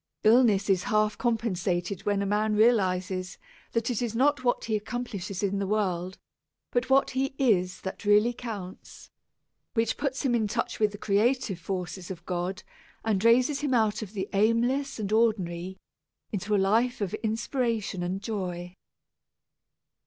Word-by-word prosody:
Illness 215 Hz, -3 st, +5 dB
is 195 Hz, 0 st, +2 dB
half 215 Hz, -3 st, +2 dB
compensated 200 Hz, -6 st, -1 dB
when 200 Hz, -1 st, +1 dB
a -, -, -1 dB
man 210 Hz, +2 st, +1 dB
realizes 185 Hz, -4 st, +2 dB, 0.4 s
that 230 Hz, +1 st, 0 dB
it 240 Hz, -, -2 dB
is 230 Hz, -2 st, -2 dB
not 280 Hz, +2 st, +2 dB
what 245 Hz, -1 st, +1 dB
he 220 Hz, -, 0 dB
accomplishes 210 Hz, -4 st, -4 dB
in 200 Hz, 0 st, 0 dB
the 200 Hz, -, -1 dB
world, 185 Hz, -3 st, -1 dB, 0.5 s
but 245 Hz, +2 st, 0 dB
what 270 Hz, +1 st, +4 dB
he 265 Hz, +1 st, -1 dB
is 190 Hz, -8 st, +2 dB
that 190 Hz, -, -6 dB
really 210 Hz, +3 st, +4 dB
counts, 210 Hz, -7 st, -8 dB, 0.6 s
which 225 Hz, 0 st, +1 dB
puts 275 Hz, -1 st, -2 dB
him 260 Hz, -3 st, +1 dB
in 225 Hz, -3 st, +2 dB
touch 235 Hz, +3 st, -2 dB
with 215 Hz, -1 st, +3 dB
the 205 Hz, -, -8 dB
creative 210 Hz, 0 st, +1 dB
forces 180 Hz, 0 st, -5 dB
of 175 Hz, -2 st, -8 dB
God 180 Hz, +2 st, -3 dB, 0.4 s
and 210 Hz, -3 st, +1 dB
raises 250 Hz, +5 st, +4 dB
him 285 Hz, -4 st, 0 dB
out 220 Hz, -2 st, +2 dB
of 210 Hz, -2 st, -7 dB
the 195 Hz, -2 st, -3 dB
aimless 240 Hz, +7 st, +1 dB
and 210 Hz, -2 st, -3 dB
ordinary 190 Hz, -5 st, +1 dB, 0.5 s
into 210 Hz, 0 st, -1 dB
a -, -, +4 dB
life 225 Hz, +6 st, +2 dB
of 200 Hz, -3 st, -2 dB
inspiration 225 Hz, -3 st, -1 dB
and 185 Hz, +3 st, -3 dB
joy. 180 Hz, -5 st, -4 dB
210 Hz, 155 wpm, -27 LUFS, 190-235 Hz, 0.6 s, Illness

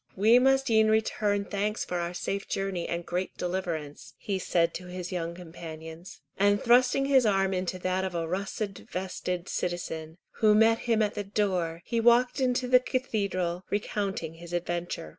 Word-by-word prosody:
"We 220 Hz, +5 st, +6 dB
must 270 Hz, 0 st, +3 dB
e'en 220 Hz, -1 st, +5 dB
return 210 Hz, -2 st, +1 dB
thanks 205 Hz, +2 st, -2 dB
for 180 Hz, -, -2 dB
our 170 Hz, +1 st, -3 dB
safe 200 Hz, +2 st, -3 dB
journey 195 Hz, -3 st, -2 dB
and 170 Hz, 0 st, -3 dB
great 180 Hz, +2 st, -3 dB
deliverance," 160 Hz, -7 st, -4 dB
he 195 Hz, -2 st, -3 dB
said 170 Hz, -2 st, +1 dB
to 180 Hz, -, -7 dB
his 180 Hz, 0 st, -6 dB
young 170 Hz, -2 st, -3 dB
companions, 165 Hz, -1 st, -10 dB, 0.2 s
and 205 Hz, +1 st, +4 dB
thrusting 250 Hz, +4 st, +4 dB
his 270 Hz, -2 st, +5 dB
arm 195 Hz, -3 st, +2 dB
into 185 Hz, 0 st, -2 dB
that 185 Hz, +1 st, -1 dB
of 190 Hz, -2 st, -3 dB
a 165 Hz, -1 st, -1 dB
russet 195 Hz, +2 st, -3 dB
vested 180 Hz, -1 st, -3 dB
citizen, 160 Hz, -2 st, -4 dB, 0.2 s
who 215 Hz, -1 st, +5 dB
met 225 Hz, +1 st, +5 dB
him 220 Hz, -1 st, +4 dB
at 210 Hz, -, -1 dB
the 205 Hz, -, -3 dB
door, 185 Hz, -5 st, -1 dB
he 235 Hz, -, -1 dB
walked 240 Hz, +3 st, +4 dB
into 250 Hz, -1 st, +1 dB
the 250 Hz, 0 st, +6 dB
cathedral, 200 Hz, -9 st, -2 dB
recounting 200 Hz, -5 st, -2 dB
his 170 Hz, +1 st, -11 dB
adventure. 175 Hz, -, -3 dB
190 Hz, 170 wpm, -28 LUFS, 175-215 Hz, 0.2 s, We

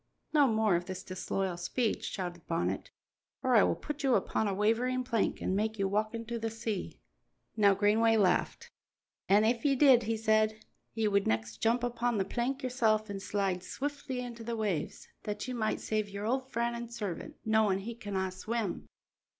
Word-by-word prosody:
"No 290 Hz, -3 st, +6 dB
more 220 Hz, -4 st, +3 dB
of 175 Hz, +1 st, -1 dB
this 185 Hz, 0 st, -6 dB
disloyal 185 Hz, 0 st, -3 dB
speech," 215 Hz, +6 st, -1 dB
shouted 175 Hz, -3 st, -5 dB
Bonnet, 165 Hz, 0 st, -1 dB, 0.5 s
"or 255 Hz, -1 st, +3 dB
I 215 Hz, -, +8 dB
will -, -, +3 dB
put 295 Hz, -1 st, -6 dB
you 265 Hz, -4 st, +3 dB
upon 220 Hz, -, 0 dB
a 200 Hz, -, 0 dB
wavering 240 Hz, +5 st, +1 dB
plank 230 Hz, -4 st, 0 dB
and 190 Hz, -, 0 dB
make 215 Hz, +2 st, 0 dB
you 195 Hz, -1 st, +1 dB
walk 215 Hz, +3 st, 0 dB
into 230 Hz, +1 st, -4 dB
the 225 Hz, 0 st, -2 dB
sea." 220 Hz, -3 st, -4 dB, 0.6 s
Now 200 Hz, -3 st, +5 dB
Greenway 220 Hz, +3 st, +4 dB
laughed. 215 Hz, -, +1 dB, 0.6 s
"An' 205 Hz, +2 st, +5 dB
if 230 Hz, +1 st, +1 dB
ye 280 Hz, -2 st, +3 dB
did," 265 Hz, -3 st, +6 dB
he 225 Hz, 0 st, -1 dB
said, 215 Hz, 0 st, +1 dB, 0.3 s
"ye 220 Hz, -1 st, +1 dB
would 200 Hz, -1 st, +2 dB
next 110 Hz, 0 st, -1 dB
jump 235 Hz, -, +1 dB
upon 240 Hz, -1 st, 0 dB
the 195 Hz, -, +1 dB
plank 255 Hz, +6 st, -2 dB
yoursel' 225 Hz, -4 st, +2 dB
an' 200 Hz, -1 st, -4 dB
slide 195 Hz, -2 st, -1 dB
swiftly 270 Hz, +4 st, -4 dB
into 235 Hz, -2 st, -7 dB
the 230 Hz, 0 st, -3 dB
waves, 205 Hz, -7 st, -2 dB
that 210 Hz, +2 st, -4 dB
ye 255 Hz, -, -3 dB
might 220 Hz, -3 st, -1 dB
save 215 Hz, -1 st, -1 dB
your 200 Hz, +1 st, -5 dB
old 260 Hz, +3 st, -1 dB
friend 235 Hz, 0 st, 0 dB
an' 235 Hz, 0 st, -6 dB
servant, 205 Hz, -7 st, -5 dB
knowin' 220 Hz, -3 st, +3 dB
he 235 Hz, +4 st, -5 dB
canna 200 Hz, -5 st, -3 dB
swim." 215 Hz, +2 st, -3 dB
220 Hz, 185 wpm, -31 LUFS, 200-235 Hz, 0.6 s, I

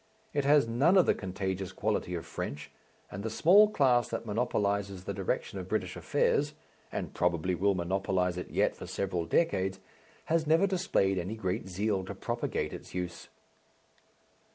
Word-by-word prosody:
It 145 Hz, -1 st, 0 dB
has 145 Hz, -3 st, +5 dB
none 140 Hz, +12 st, +4 dB
of 185 Hz, -, +6 dB
the -, -, +4 dB
contagious 95 Hz, 0 st, -4 dB
quality 100 Hz, -3 st, -1 dB
of 85 Hz, -, -5 dB
French, 75 Hz, +1 st, -6 dB, 0.4 s
and 95 Hz, -, -5 dB
the 110 Hz, -, -3 dB
small 195 Hz, -, +6 dB
class 130 Hz, -, +3 dB
that 115 Hz, 0 st, -4 dB
monopolizes 100 Hz, -4 st, -1 dB
the 100 Hz, -, -4 dB
direction 95 Hz, 0 st, -2 dB
of 90 Hz, -, -6 dB
British 95 Hz, -4 st, -1 dB
affairs, 145 Hz, 0 st, +1 dB, 0.4 s
and -, -, -4 dB
probably 90 Hz, +1 st, +1 dB
will 100 Hz, +3 st, +2 dB
monopolize 90 Hz, 0 st, 0 dB
it 90 Hz, -, -6 dB
yet -, -, +1 dB
for -, -, -9 dB
several 90 Hz, -4 st, -2 dB
decades, 95 Hz, -, +1 dB, 0.5 s
has 160 Hz, -1 st, +1 dB
never 165 Hz, +5 st, +5 dB
displayed 175 Hz, -, +1 dB
any 95 Hz, +5 st, -4 dB
great 95 Hz, -1 st, -3 dB
zeal 100 Hz, +1 st, 0 dB
to 100 Hz, -, -6 dB
propagate 120 Hz, +4 st, -2 dB
its -, -, -9 dB
use. 90 Hz, -1 st, -4 dB
100 Hz, 160 wpm, -30 LUFS, 90-120 Hz, 0.5 s, of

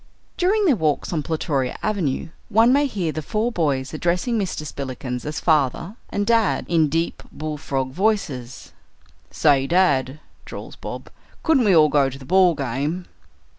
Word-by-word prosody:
During 400 Hz, +3 st, +2 dB
their 300 Hz, -8 st, +4 dB
walks 155 Hz, -3 st, -1 dB
on 160 Hz, -, 0 dB
Plutoria 145 Hz, -4 st, -2 dB
Avenue 180 Hz, -10 st, -1 dB, 0.2 s
one 225 Hz, +4 st, +5 dB
may 285 Hz, +1 st, +3 dB
hear 185 Hz, -, -2 dB
the 155 Hz, -, -4 dB
four 220 Hz, +9 st, -1 dB
boys 140 Hz, -, -1 dB
addressing 175 Hz, +9 st, 0 dB
Mr. 185 Hz, -6 st, -3 dB
Spillikins 130 Hz, -3 st, -5 dB
as 150 Hz, 0 st, -3 dB
"father" 155 Hz, -, +1 dB
and 205 Hz, -, -1 dB
"dad" 230 Hz, -2 st, +2 dB
in 160 Hz, -3 st, +2 dB
deep 165 Hz, +2 st, -1 dB
bull 155 Hz, -1 st, -5 dB
frog 135 Hz, -2 st, -2 dB
voices. 155 Hz, -, -2 dB, 0.6 s
"Say, 140 Hz, -3 st, +3 dB
dad," 145 Hz, -6 st, +2 dB, 0.2 s
drawls -, -, -9 dB
Bob, -, -, -8 dB, 0.3 s
"couldn't 290 Hz, -7 st, +3 dB
we 195 Hz, -4 st, +5 dB
all 155 Hz, -2 st, +6 dB
go 140 Hz, -2 st, +3 dB
to 135 Hz, -, -9 dB
the 135 Hz, -, -12 dB
ball 180 Hz, +1 st, +4 dB
game?" 140 Hz, +7 st, -2 dB
160 Hz, 160 wpm, -22 LUFS, 140-200 Hz, 0.6 s, all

